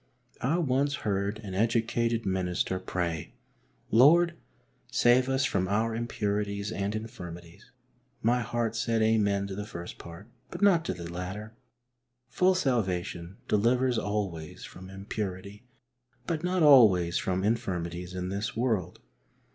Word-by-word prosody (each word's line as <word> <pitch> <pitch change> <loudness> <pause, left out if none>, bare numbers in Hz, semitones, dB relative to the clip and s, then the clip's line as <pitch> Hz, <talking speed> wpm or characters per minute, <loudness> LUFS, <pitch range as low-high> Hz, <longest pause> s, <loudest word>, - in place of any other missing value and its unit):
I 145 +7 +1
once 140 -3 +1
heard 100 0 0
an 95 -3 -6
educated 115 +2 +1
minister 95 -1 -1
pray, 85 -3 -3 0.3
" - - -38 0.3
Lord, 170 +8 +6 0.6
save 125 +2 +4
us 135 0 +2
from 95 -9 0
our 110 +3 0
impurities 105 -3 -2
and 100 0 -2
infirmities." 85 -6 -8 0.5
My 120 +3 +3
heart 115 -1 -2
said 115 -1 +1
Amen 100 -3 +2
to 100 - -6
the 105 +2 -4
first 85 -4 -8
part, 85 +5 -11 0.2
but - - -5
not 180 -5 +5
to - - -2
the 85 -1 -7
latter. 95 +5 -6 0.8
Full 185 +5 +3
salvation 95 - -1
delivers 120 +3 +2
always 100 -7 -4
from 95 +1 -10
impurity, 100 +2 -6 0.6
but 160 -1 -2
not 180 -1 +1
always 105 - +6
from 95 0 -1
infirmities 90 -5 -2
in 90 0 -3
this 105 +4 -3
world. 115 -7 -1
105 Hz, 130 wpm, -28 LUFS, 95-120 Hz, 0.8 s, Lord